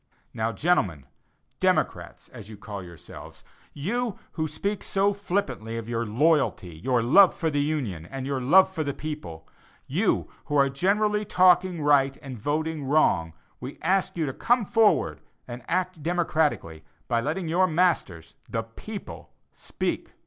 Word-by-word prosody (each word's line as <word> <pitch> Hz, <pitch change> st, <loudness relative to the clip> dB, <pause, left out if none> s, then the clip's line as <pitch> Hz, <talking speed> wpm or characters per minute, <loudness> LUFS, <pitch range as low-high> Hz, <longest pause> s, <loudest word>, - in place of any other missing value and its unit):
Now, 110 Hz, 0 st, -1 dB
gentlemen, 105 Hz, -, 0 dB, 0.5 s
"democrats" -, -, -1 dB
as 105 Hz, -, -11 dB
you 110 Hz, -, -10 dB
call 100 Hz, 0 st, -7 dB
yourselves, 85 Hz, -3 st, -12 dB, 0.3 s
you 215 Hz, -, -2 dB
who 160 Hz, -1 st, -2 dB
speak 200 Hz, +7 st, -3 dB
so 200 Hz, +1 st, +1 dB
flippantly 190 Hz, -, -3 dB
of 115 Hz, -1 st, -6 dB
your 115 Hz, -1 st, -2 dB
"loyalty," 125 Hz, -, +1 dB
your 120 Hz, +6 st, 0 dB
"love 185 Hz, +11 st, +6 dB
for 160 Hz, -2 st, -1 dB
the 145 Hz, -1 st, +1 dB
Union" 125 Hz, -, -2 dB
and 135 Hz, +6 st, -6 dB
your 135 Hz, -1 st, -2 dB
"love 185 Hz, +9 st, +5 dB
for 160 Hz, -, -2 dB
the 140 Hz, -2 st, -3 dB
people;" 115 Hz, -, -7 dB, 0.4 s
you -, -, 0 dB, 0.2 s
who 145 Hz, -, -3 dB
are 140 Hz, -1 st, +4 dB
generally 210 Hz, +8 st, +1 dB
talking 180 Hz, -3 st, +3 dB
right 140 Hz, -2 st, +3 dB
and 130 Hz, -4 st, -7 dB
voting 155 Hz, +4 st, -2 dB
wrong, 95 Hz, -, +2 dB, 0.3 s
we 130 Hz, +3 st, -8 dB
ask 185 Hz, +1 st, +1 dB
you 160 Hz, -, 0 dB
to 135 Hz, -, -3 dB
come 240 Hz, -, +1 dB
forward 195 Hz, -, +2 dB, 0.3 s
and 120 Hz, +1 st, -7 dB
act 185 Hz, -2 st, -1 dB
"democratically," 160 Hz, -, -1 dB, 0.2 s
by 115 Hz, -2 st, +1 dB
letting 160 Hz, +7 st, -2 dB
your 180 Hz, +3 st, +3 dB
masters, 155 Hz, -, 0 dB, 0.2 s
the 115 Hz, -, -2 dB
people, 195 Hz, -, -9 dB, 0.2 s
speak. -, -, -4 dB
150 Hz, 150 wpm, -26 LUFS, 115-180 Hz, 0.5 s, love